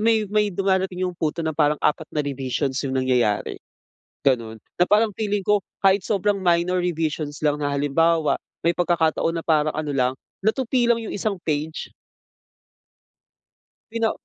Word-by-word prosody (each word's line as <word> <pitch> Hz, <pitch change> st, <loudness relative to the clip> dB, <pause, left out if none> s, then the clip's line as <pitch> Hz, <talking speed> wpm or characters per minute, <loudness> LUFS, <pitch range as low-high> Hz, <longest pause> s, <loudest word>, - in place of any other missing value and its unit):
may 220 Hz, -1 st, +3 dB
may 210 Hz, -1 st, +3 dB
dumarating 190 Hz, -1 st, 0 dB
iyong 180 Hz, -, -2 dB
punto 160 Hz, +1 st, -1 dB
na 160 Hz, -, 0 dB
parang 150 Hz, 0 st, +2 dB
4 150 Hz, +1 st, +1 dB
na 150 Hz, -1 st, -2 dB
revisions 135 Hz, 0 st, -2 dB
iyung 135 Hz, -2 st, -2 dB
nangyayari, 125 Hz, -5 st, +1 dB, 0.7 s
ganoon, 115 Hz, -5 st, +1 dB, 0.2 s
na 180 Hz, -, +4 dB
parang 210 Hz, 0 st, +3 dB
feeling 205 Hz, -1 st, -2 dB
ko 210 Hz, -1 st, +3 dB, 0.2 s
kahit 195 Hz, +1 st, +5 dB
sobrang 200 Hz, 0 st, 0 dB
minor 175 Hz, +1 st, +2 dB
revisions 155 Hz, -3 st, -2 dB
lang 150 Hz, 0 st, +1 dB
na, 145 Hz, -, 0 dB
halimbawa, 150 Hz, +3 st, +1 dB, 0.2 s
may 170 Hz, -, +4 dB
pagkakataon 165 Hz, -1 st, +1 dB
na 165 Hz, -, -5 dB
parang 155 Hz, -2 st, +2 dB
ano 150 Hz, -2 st, -2 dB
lang, 130 Hz, -1 st, +1 dB, 0.3 s
natupi 240 Hz, +3 st, +1 dB
lang 235 Hz, -, +4 dB
iyong 225 Hz, -2 st, -5 dB
isang 205 Hz, -1 st, -2 dB
page. 155 Hz, +1 st, -3 dB, 2.0 s
Pina 230 Hz, -1 st, +1 dB
165 Hz, 150 wpm, -23 LUFS, 145-200 Hz, 2.0 s, kahit